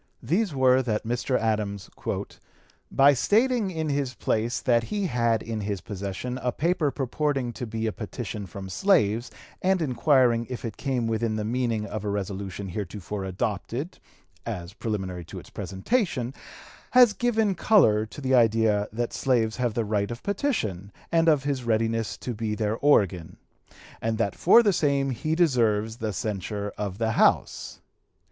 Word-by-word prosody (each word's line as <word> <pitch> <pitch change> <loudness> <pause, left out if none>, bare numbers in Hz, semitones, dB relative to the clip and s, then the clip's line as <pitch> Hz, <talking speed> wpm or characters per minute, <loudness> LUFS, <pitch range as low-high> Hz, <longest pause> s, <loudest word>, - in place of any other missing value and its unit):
These 195 +3 +1
were, 130 0 +4
that 110 -4 -2
Mr. 120 +2 0
Adams 105 -3 -1 1.0
"by 140 +1 +6
stating 220 - +2
in 160 -3 -3
his 140 -3 -1
place 115 +2 -1
that 120 -2 +2
he 205 - -2
had 115 - +1
in 110 -2 -4
his 100 -1 -2
possession 100 +7 -5
a 125 -1 -1
paper 165 +1 +1
purporting 135 -2 -1
to 125 - -5
be 110 0 -3
a 110 - 0
petition 105 -2 -6
from 95 +2 -8
slaves, 115 - +2 0.3
and 190 0 +2
inquiring 125 -4 +3
if 125 -1 -5
it 110 - -5
came 130 -4 -1
within 115 0 0
the 105 -1 -2
meaning 115 -2 -1
of 105 0 -5
a 105 - -2
resolution 100 -1 -4
heretofore 100 +1 -5
adopted 110 - -3 0.4
(as 85 +1 -5
preliminary 95 -6 -4
to - - -9
its - - -11
presentation), 130 - -1 0.6
has 250 -4 +7
given 225 -3 +1
color 160 - +4
to 145 - -10
the 130 -1 0
idea 110 -3 +3
that 120 +2 -3
slaves 115 -4 +1
have 120 -3 -1
the 115 - 0
right 105 -1 0
of 120 +1 -7
petition 110 - -2 0.2
and 165 0 +4
of 150 -3 +3
his 140 -3 -2
readiness 115 -1 0
to 125 - -5
be 110 -1 -2
their 105 0 -1
organ; 95 - +2 0.6
and 110 0 -1
that 110 -3 0
for 230 +7 +6
the 205 -3 +3
same 140 -4 +1
he 155 +6 -1
deserves 115 -9 +2
the 110 -3 -2
censure 100 +1 -3
of 100 -2 -4
the 110 0 0
House. - - +1
115 Hz, 160 wpm, -26 LUFS, 105-140 Hz, 1.0 s, has